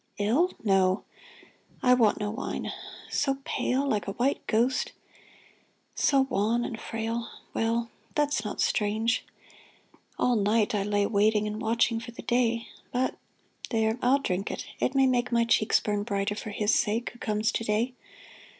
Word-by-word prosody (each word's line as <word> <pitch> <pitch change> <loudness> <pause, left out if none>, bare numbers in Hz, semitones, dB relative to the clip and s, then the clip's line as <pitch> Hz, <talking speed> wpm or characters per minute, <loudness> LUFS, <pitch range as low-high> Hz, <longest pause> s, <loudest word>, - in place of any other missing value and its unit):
Ill? 255 - +2
No! 190 -2 +3 0.8
(I 250 - +6
want 230 -4 +3
no 210 -1 -2
wine.) 220 - -4 0.4
So 275 -2 +1
pale? 270 +2 0
Like 210 -6 0
a 195 - -2
white 265 +6 0
ghost, 240 +4 +1 1.0
so 275 -2 +3
wan 235 -2 +1
and 225 - -5
frail? 225 +1 -3 0.2
Well, 230 +1 0 0.2
that's 290 -7 +1
not 210 - -3
strange. 220 +2 +1 0.9
All 250 - +2
night 210 +1 +2
I 205 - +1
lay 205 0 +1
Waiting 210 0 +2
and 210 +1 -4
watching 230 +1 +2
for 230 - -9
the - - -9
day. 235 -1 +1 0.2
But 255 +1 0 0.3
— - - -13
there! 220 0 +1
I'll 255 +3 +4
drink 195 -7 -2
it; - - -5
it 265 - 0
may 270 0 +5
make 250 -2 +1
My 235 -1 +3
cheeks 220 -2 +3
burn 205 -1 -1
brighter 200 -1 -1
for 210 +1 -6
his 210 +1 +1
sake 225 +3 +1
Who 240 - -17
comes 215 +1 0
to 230 - -2
day. 225 +4 0
225 Hz, 160 wpm, -28 LUFS, 210-245 Hz, 1.0 s, I